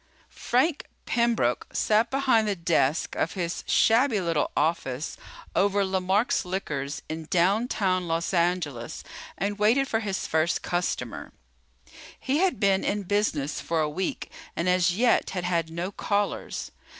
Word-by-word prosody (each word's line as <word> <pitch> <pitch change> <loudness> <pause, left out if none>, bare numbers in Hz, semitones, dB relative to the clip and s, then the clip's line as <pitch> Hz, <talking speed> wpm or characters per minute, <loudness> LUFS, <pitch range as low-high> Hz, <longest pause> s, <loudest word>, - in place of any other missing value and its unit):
_ - - -27
Frank 270 +6 0 0.2
Pembroke 235 - +1
sat 220 +2 +2
behind 260 -5 +2
the 205 - 0
desk 165 -3 +1
of 165 - -1
his 175 -3 -3
shabby 230 0 +4
little 165 -5 0
office 150 -3 -1 0.4
over 200 0 +3
Lemark's 190 +4 +1
Liquors 150 -7 -4
in 160 0 -5
downtown 185 0 +1
Los 165 +3 -1
Angeles 170 -9 -1 0.3
and 200 +2 -2
waited 240 +6 +3
for 225 - 0
his 200 -4 -3
first 160 +2 0
customer. 175 -9 -3 0.9
He 275 +3 0
had 375 0 +1
been 195 -1 +3
in 205 0 -1
business 175 -8 -1
for 165 -1 -1
a 155 - +2
week 180 +5 -3 0.2
and 170 - -1
as 180 0 +3
yet 240 +1 +3
had 180 - -1
had 170 -2 0
no 170 +4 -4
callers. 205 0 -2
185 Hz, 140 wpm, -26 LUFS, 165-210 Hz, 0.9 s, shabby